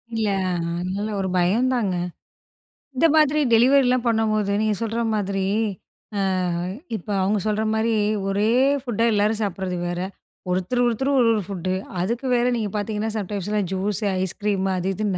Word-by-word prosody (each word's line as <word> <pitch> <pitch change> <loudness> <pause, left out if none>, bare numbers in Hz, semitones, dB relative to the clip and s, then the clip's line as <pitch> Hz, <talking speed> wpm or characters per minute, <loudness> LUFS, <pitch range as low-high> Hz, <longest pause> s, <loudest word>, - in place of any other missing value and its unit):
இல்ல. 220 -1 0 0.5
ஆனாலும் 200 +3 -3
ஒரு 190 - -2
பயந்தாங்க. 210 +2 +1 1.0
இந்த 330 - +4
மாதிரி 305 -1 +4
டெலிவரிலாம் 255 +1 +4
பண்ணும்போது 215 -3 +1
நீங்க 215 -1 +1
சொல்ற 225 +1 -1
மாதிரி, 195 -2 -1 0.7
அ - - 0 0.8
இப்போ 210 +1 -6
அவுங்க 205 +2 +1
சொல்ற 215 +1 0
மாரி 225 +1 +1 0.4
ஒரே 205 +3 +1 0.3
ஃபுட்டா 230 -3 0
எல்லாரும் 210 +2 +1
சாப்பிடறது 190 -2 -3
வேற. 175 0 -3 0.5
ஒருத்தரு, 185 +7 0
ஒருத்தரு 250 +4 0
ஒரு 240 - +4
ஓரு 215 - 0
ஃபுட்டு 185 -2 -3 0.3
அதுக்கு 235 +8 -2
வேற 240 0 +2
நீங்க 215 -3 -2
பாத்தீங்கன்னா, 215 +1 -2
சம்டைம்ஸ்லாம் 205 0 -2
ஜூஸ், 200 +3 -1 0.2
ஐஸ் 190 -1 -3
கிரீமு 195 -2 +1
அது 180 +1 -1
இதுன்னு 205 -3 -1
210 Hz, 140 wpm, -23 LUFS, 195-230 Hz, 1.0 s, இந்த